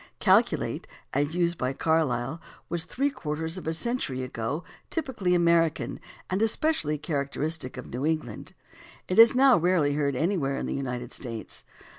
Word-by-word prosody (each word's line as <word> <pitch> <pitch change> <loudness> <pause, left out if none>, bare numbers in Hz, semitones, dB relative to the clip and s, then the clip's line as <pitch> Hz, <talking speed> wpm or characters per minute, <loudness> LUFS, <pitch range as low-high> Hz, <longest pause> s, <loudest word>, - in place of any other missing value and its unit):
"Calculate/' - - +2 0.3
as 145 +4 0
used 175 -1 +1
by 130 +1 -1
Carlyle, 150 -2 0 0.3
was 170 0 -1
three 280 +3 -1
quarters 160 - -3
of 170 - -10
a 160 - 0
century 165 - -2
ago 130 +6 -3 0.3
typically 245 - 0
American 170 -2 +2 0.3
and 185 +3 -1
especially 225 - +2
characteristic 145 -1 -2
of 125 - -6
New 125 +3 -5
England. 155 -9 -3 0.5
It 185 - +1
is 230 +2 +9
now 265 -1 +6
rarely 165 -4 +2
heard 140 -2 0
anywhere 150 -3 0
in - - -3
the - - -2
United 125 -2 -4
States. 115 -4 -6
160 Hz, 150 wpm, -27 LUFS, 135-180 Hz, 0.5 s, is